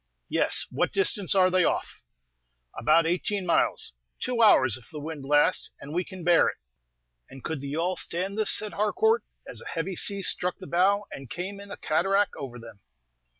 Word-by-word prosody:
"Yes. -, -, +1 dB
What -, -, 0 dB
distance 195 Hz, -1 st, +1 dB
are 185 Hz, -1 st, +4 dB
they 185 Hz, 0 st, +3 dB
off?" -, -, -2 dB, 0.7 s
"About 165 Hz, 0 st, +3 dB
eighteen 185 Hz, +3 st, -1 dB
miles. 170 Hz, -, +1 dB, 0.3 s
Two 245 Hz, -2 st, -1 dB
hours, 130 Hz, -, +5 dB
if 120 Hz, -4 st, -11 dB
the 150 Hz, -, -8 dB
wind 150 Hz, -1 st, -7 dB
lasts, 145 Hz, +2 st, +2 dB
and 145 Hz, +2 st, -9 dB
we 180 Hz, +2 st, 0 dB
can 185 Hz, -1 st, -10 dB
bear 170 Hz, 0 st, +5 dB
it." -, -, -3 dB, 0.7 s
"And 135 Hz, -1 st, -12 dB
could 160 Hz, -4 st, -4 dB
the 140 Hz, -, -6 dB
yawl 170 Hz, +5 st, -1 dB
stand 185 Hz, +5 st, -2 dB
this?" 215 Hz, -1 st, +1 dB
said 215 Hz, -1 st, +1 dB
Harcourt, 440 Hz, -, +1 dB, 0.2 s
as -, -, -7 dB
a -, -, -10 dB
heavy 180 Hz, +3 st, -3 dB
sea 200 Hz, +2 st, +4 dB
struck 180 Hz, 0 st, 0 dB
the 190 Hz, -, -10 dB
bow, 195 Hz, +4 st, +2 dB
and 135 Hz, -3 st, -9 dB
came 195 Hz, +3 st, -5 dB
in 200 Hz, 0 st, -11 dB
a 205 Hz, -, -7 dB
cataract 195 Hz, +6 st, +1 dB
over 130 Hz, -3 st, -7 dB
them. 115 Hz, -3 st, -12 dB
180 Hz, 190 wpm, -26 LUFS, 150-200 Hz, 0.7 s, hours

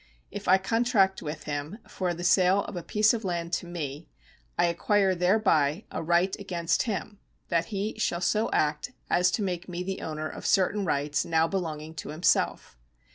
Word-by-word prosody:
If 205 Hz, -, -7 dB
I 190 Hz, -, +7 dB
contract 205 Hz, -1 st, +2 dB
with 150 Hz, 0 st, -6 dB
him 145 Hz, +5 st, -4 dB
for 180 Hz, -2 st, -2 dB
the 175 Hz, -, -6 dB
sale 185 Hz, +2 st, +4 dB
of 210 Hz, -, -8 dB
a 175 Hz, -, -3 dB
piece 215 Hz, +5 st, +3 dB
of 230 Hz, -1 st, -3 dB
land 170 Hz, -2 st, -3 dB
to 175 Hz, -, -1 dB
me, 155 Hz, -3 st, -6 dB, 0.5 s
I 175 Hz, -, +4 dB
acquire 190 Hz, +3 st, +2 dB
thereby 180 Hz, -3 st, +2 dB
a -, -, -3 dB
right 175 Hz, +3 st, +2 dB
against 175 Hz, +2 st, -1 dB
him, 205 Hz, 0 st, -4 dB, 0.3 s
that 170 Hz, -1 st, +1 dB
he 210 Hz, 0 st, -4 dB
shall 175 Hz, -5 st, 0 dB
so 215 Hz, +5 st, +1 dB
act 150 Hz, +10 st, 0 dB, 0.2 s
as 180 Hz, +1 st, +4 dB
to 210 Hz, -, -1 dB
make 180 Hz, -1 st, -3 dB
me 180 Hz, 0 st, -4 dB
the 190 Hz, +1 st, -4 dB
owner 155 Hz, 0 st, -4 dB
of -, -, -6 dB
certain 195 Hz, +1 st, +2 dB
rights 145 Hz, -2 st, 0 dB
now 160 Hz, 0 st, +2 dB
belonging 160 Hz, -3 st, -4 dB
to -, -, -6 dB
himself. 155 Hz, -, 0 dB
180 Hz, 185 wpm, -27 LUFS, 160-195 Hz, 0.5 s, I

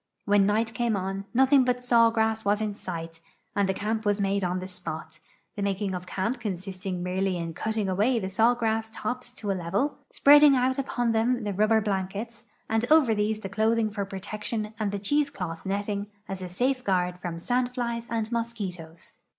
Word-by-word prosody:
"When 205 Hz, -1 st, +4 dB
night 220 Hz, +2 st, +1 dB
came 235 Hz, -2 st, 0 dB
on, 195 Hz, +1 st, -3 dB
nothing 265 Hz, +2 st, +5 dB
but 250 Hz, 0 st, 0 dB
saw 235 Hz, -2 st, +5 dB
grass 220 Hz, -1 st, 0 dB
was 205 Hz, +1 st, +2 dB
in 215 Hz, -1 st, -1 dB
sight, 165 Hz, -4 st, -6 dB, 0.4 s
and 200 Hz, -1 st, +2 dB
camp 220 Hz, +2 st, -2 dB
was 205 Hz, -1 st, +1 dB
made 200 Hz, 0 st, +1 dB
on 180 Hz, 0 st, 0 dB
tbe 185 Hz, +1 st, -7 dB
spot, 160 Hz, -3 st, -7 dB, 0.4 s
the 205 Hz, -, -4 dB
making 200 Hz, 0 st, -1 dB
of 180 Hz, 0 st, -5 dB
canij) 220 Hz, +8 st, -2 dB
consisting 185 Hz, -3 st, -4 dB
merely 185 Hz, 0 st, 0 dB
in 165 Hz, -1 st, -4 dB
cutting 220 Hz, +3 st, -2 dB
away 210 Hz, +7 st, +2 dB
the 195 Hz, -4 st, -2 dB
saw 225 Hz, +6 st, +3 dB
grass 225 Hz, -1 st, -1 dB
tops 245 Hz, +3 st, -4 dB
to 210 Hz, -5 st, -3 dB
a -, -, +2 dB
level, 190 Hz, -, -1 dB
S{)reading 290 Hz, 0 st, +7 dB
out 260 Hz, +2 st, +1 dB
upon 245 Hz, -3 st, 0 dB
them 230 Hz, +2 st, +1 dB
the 205 Hz, -1 st, -2 dB
rubber 215 Hz, +3 st, +3 dB
blankets, 205 Hz, +3 st, -3 dB, 0.2 s
and 225 Hz, 0 st, +1 dB
over 300 Hz, -8 st, +6 dB
these 215 Hz, +1 st, 0 dB
the 195 Hz, -, -4 dB
clothing 220 Hz, +1 st, +1 dB
for 205 Hz, -1 st, -2 dB
protection 210 Hz, +3 st, -4 dB
and 210 Hz, -2 st, 0 dB
the 205 Hz, -, -2 dB
cheese 285 Hz, +9 st, +1 dB
cloth 175 Hz, -4 st, -6 dB
netting 200 Hz, +1 st, -2 dB, 0.2 s
as 195 Hz, -1 st, -5 dB
a 180 Hz, -, -5 dB
safeguard 185 Hz, -5 st, 0 dB
from 175 Hz, -2 st, -4 dB
sandflies 245 Hz, +2 st, -1 dB
and 225 Hz, -1 st, -2 dB
mos(|uitos. 190 Hz, -8 st, -5 dB
210 Hz, 185 wpm, -27 LUFS, 190-230 Hz, 0.4 s, S{)reading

